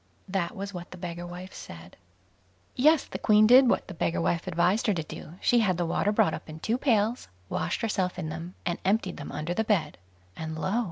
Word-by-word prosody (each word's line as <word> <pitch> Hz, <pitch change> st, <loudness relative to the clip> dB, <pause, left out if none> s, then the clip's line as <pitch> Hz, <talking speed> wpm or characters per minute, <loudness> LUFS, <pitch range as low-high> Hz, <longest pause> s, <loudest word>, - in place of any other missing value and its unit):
That 185 Hz, -3 st, -2 dB
was 200 Hz, +1 st, -5 dB
what 175 Hz, 0 st, -7 dB
the 180 Hz, -, -10 dB
beggar 175 Hz, -1 st, -6 dB
wife 180 Hz, +2 st, -9 dB
said. 85 Hz, +1 st, -10 dB, 0.8 s
Yes; 305 Hz, +4 st, +5 dB
the -, -, -6 dB
Queen 215 Hz, -1 st, +5 dB
did 250 Hz, +3 st, +7 dB
what -, -, +1 dB
the 190 Hz, -, -7 dB
beggar 170 Hz, 0 st, -1 dB
wife 170 Hz, +2 st, 0 dB
advised 180 Hz, +6 st, +2 dB
her 210 Hz, -, +3 dB
to 165 Hz, -, -2 dB
do; 155 Hz, +1 st, -9 dB
she 240 Hz, -, +4 dB
had 190 Hz, -6 st, +2 dB
the 175 Hz, -, 0 dB
water 195 Hz, +5 st, +1 dB
brought 165 Hz, -6 st, +3 dB
up -, -, -7 dB
in 155 Hz, 0 st, -8 dB
two 225 Hz, +9 st, -1 dB
pails, 230 Hz, -3 st, +1 dB, 0.2 s
washed -, -, -2 dB
herself 190 Hz, -5 st, -1 dB
in 155 Hz, -, -3 dB
them, 165 Hz, +3 st, -7 dB
and 175 Hz, -1 st, -1 dB
emptied 195 Hz, -1 st, +1 dB
them 145 Hz, -, -7 dB
under 155 Hz, +3 st, -3 dB
the 220 Hz, -, 0 dB
bed; 175 Hz, -, 0 dB, 0.4 s
and 160 Hz, 0 st, -5 dB
lo! 190 Hz, +8 st, 0 dB
185 Hz, 220 wpm, -28 LUFS, 170-215 Hz, 0.8 s, did